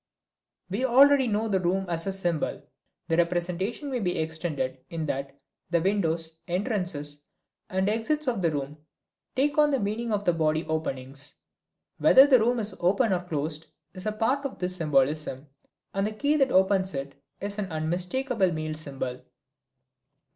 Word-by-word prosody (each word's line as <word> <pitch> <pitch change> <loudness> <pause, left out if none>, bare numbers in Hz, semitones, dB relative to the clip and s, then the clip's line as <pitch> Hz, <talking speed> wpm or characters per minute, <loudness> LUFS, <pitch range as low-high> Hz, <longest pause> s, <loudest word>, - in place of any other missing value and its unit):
We 200 +7 -2
already 265 +1 +6
know 215 0 0
the 195 -3 +1
room 185 +2 0
as 170 +1 -1
a - - +1
symbol. 175 -5 -1 0.4
The 165 -1 +1
representation 180 - -1
may 255 - -1
be 180 -5 -1
extended 155 -5 -2
in 165 -2 -3
that 140 -1 -4 0.3
the 170 -1 +2
windows, 165 -4 0
entrances 175 - -2 0.5
and 190 +1 0
exits 275 +8 0
of 235 -6 0
the 170 - +3
room 145 0 -4 0.6
take 285 +3 +1
on 300 0 +6
the 275 -2 +1
meaning 220 +3 -2
of 205 -1 -1
the 175 - +4
body 155 -1 +1
openings. 140 -3 -3 0.6
Whether 265 - +8
the 265 -3 +6
room 240 +3 +2
is 215 -2 -2
open 200 +5 +2
or 180 - 0
closed 155 -2 -3 0.3
is 185 +2 -6
a - - +1
part 235 +6 0
of 275 - -5
this 180 0 -2
symbolism, 150 -3 +1 0.5
and 195 +1 0
the 215 - -4
key 285 +7 +1
that 270 -2 +3
opens 190 -2 +3
it 135 0 -4 0.3
is 200 +1 -4
an 195 -3 -3
unmistakable 185 +7 0
male 155 -1 -3
symbol. 135 -5 -4
180 Hz, 160 wpm, -27 LUFS, 155-220 Hz, 0.6 s, Whether